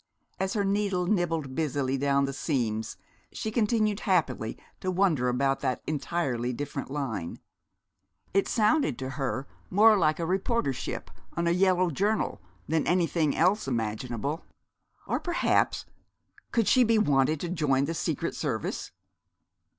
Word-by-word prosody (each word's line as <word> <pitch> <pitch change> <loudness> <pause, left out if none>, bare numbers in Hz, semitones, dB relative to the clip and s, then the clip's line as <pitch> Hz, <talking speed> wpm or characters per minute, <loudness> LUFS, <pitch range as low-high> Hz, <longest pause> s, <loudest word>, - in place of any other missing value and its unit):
As 190 0 -1
her 205 -2 0
needle 195 -2 +1
nibbled 165 -8 0
busily 140 -3 0
down 140 0 +2
the 135 - -3
seams 115 -7 -2 0.3
she 220 - -4
continued 215 -2 +1
happily 150 - 0 0.2
to 185 - -2
wonder 175 -9 +2
about 135 +2 +1
that 125 - -2
Entirely 140 -5 -1
Different 140 +2 -5
Line. 130 - -3 1.0
It 195 +1 +2
sounded 215 - +2
to 130 0 -4
her 135 0 -2 0.2
more 215 +3 +6
like 155 -5 +2
a - - -1
reportership 190 - -1 0.3
on 170 - +1
a 170 - +3
yellow 185 0 +3
journal 205 +8 0 0.3
than 160 0 0
anything 170 -3 +2
else 185 +2 +3
imaginable. 120 - -2 0.6
Or, - - -1
perhaps, 345 -1 +1 0.7
could 230 -3 +2
she 255 - +6
be 230 -1 +3
wanted 145 -5 +3
to 175 - -3
join 145 -6 +1
the 165 - -2
Secret 160 - -2
Service? - - -3
160 Hz, 135 wpm, -28 LUFS, 135-195 Hz, 1.0 s, more